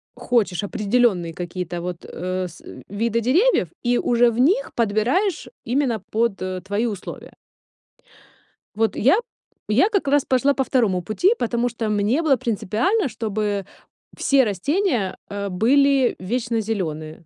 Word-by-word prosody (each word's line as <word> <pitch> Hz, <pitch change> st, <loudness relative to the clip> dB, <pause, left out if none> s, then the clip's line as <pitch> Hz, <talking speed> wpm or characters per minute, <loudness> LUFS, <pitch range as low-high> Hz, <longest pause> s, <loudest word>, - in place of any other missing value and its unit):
хочешь 210 Hz, -6 st, 0 dB
определенные 205 Hz, -5 st, +1 dB
какие-то 175 Hz, 0 st, -5 dB
вот, 175 Hz, -1 st, -6 dB
э, 185 Hz, +1 st, -3 dB
с 170 Hz, -, -14 dB, 0.3 s
виды 230 Hz, +3 st, -1 dB
деревьев 280 Hz, -, +3 dB, 0.2 s
и 245 Hz, 0 st, +3 dB
уже 240 Hz, 0 st, +3 dB
в 230 Hz, -, -4 dB
них 385 Hz, -, +2 dB
подбираешь 240 Hz, -, 0 dB, 0.2 s
именно 245 Hz, -4 st, 0 dB
под 225 Hz, -2 st, +1 dB, 0.3 s
твои 205 Hz, +4 st, -1 dB
условия. 200 Hz, -4 st, -7 dB, 1.4 s
Вот 225 Hz, 0 st, +1 dB
я 275 Hz, -, +4 dB, 0.5 s
я 260 Hz, -, +3 dB
как 395 Hz, -9 st, 0 dB
раз 285 Hz, 0 st, +3 dB
пошла 265 Hz, +2 st, +2 dB
по 270 Hz, -, 0 dB
2 225 Hz, -9 st, +1 dB
пути, 285 Hz, -, +2 dB
потому 240 Hz, +1 st, 0 dB
что 225 Hz, -2 st, -3 dB
мне 210 Hz, +9 st, +1 dB
было 295 Hz, -5 st, +3 dB
принципиально, 240 Hz, -, 0 dB
чтобы 210 Hz, -3 st, -2 dB, 0.5 s
все 275 Hz, -1 st, +3 dB
растения, 235 Hz, -, 0 dB
э, 200 Hz, 0 st, -4 dB
были 270 Hz, +6 st, +3 dB
вечнозеленые. 190 Hz, -8 st, -3 dB
225 Hz, 130 wpm, -22 LUFS, 200-260 Hz, 1.4 s, я